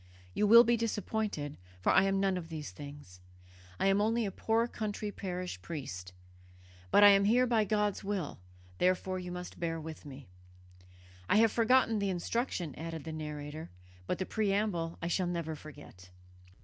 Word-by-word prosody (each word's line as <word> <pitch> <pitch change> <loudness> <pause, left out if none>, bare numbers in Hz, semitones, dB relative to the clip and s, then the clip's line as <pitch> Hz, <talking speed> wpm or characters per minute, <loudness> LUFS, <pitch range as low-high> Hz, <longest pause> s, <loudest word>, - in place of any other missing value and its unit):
You 210 - +2
will 235 +3 +10
be 240 0 +3
disappointed, 210 -8 -2 0.2
for 90 - +2
I 195 - +5
am 195 0 +1
none 195 -1 +2
of 170 -2 -5
these 155 - -6
things. 140 -5 -11 0.6
I - - +1
am 195 +1 +4
only 225 +2 +1
a 195 - -2
poor 225 +4 +1
country 210 -2 -4
parish 180 -2 -5
priest. 95 - -6 0.8
But 205 - +6
I 205 - +11
am 200 0 +5
here 245 +4 +4
by 230 -3 +2
God's 210 0 0
will 195 - -3 0.4
therefore 185 +1 +1
you 180 -1 -6
must 180 0 -7
bear 165 -1 -2
with 160 0 -8
me.' 140 -3 -11 1.0
I - - +4
have 225 0 +5
forgotten 230 -1 +3
the 200 -1 0
instruction," 180 - -2
added 165 -2 -5
the 160 - -6
narrator, 150 0 -6 0.4
"but - - -1
the 185 - -2
preamble 200 -6 -1
I - - 0
shall 180 +1 0
never 170 -2 -3
forget." 145 -12 -13
185 Hz, 170 wpm, -32 LUFS, 160-210 Hz, 1.0 s, I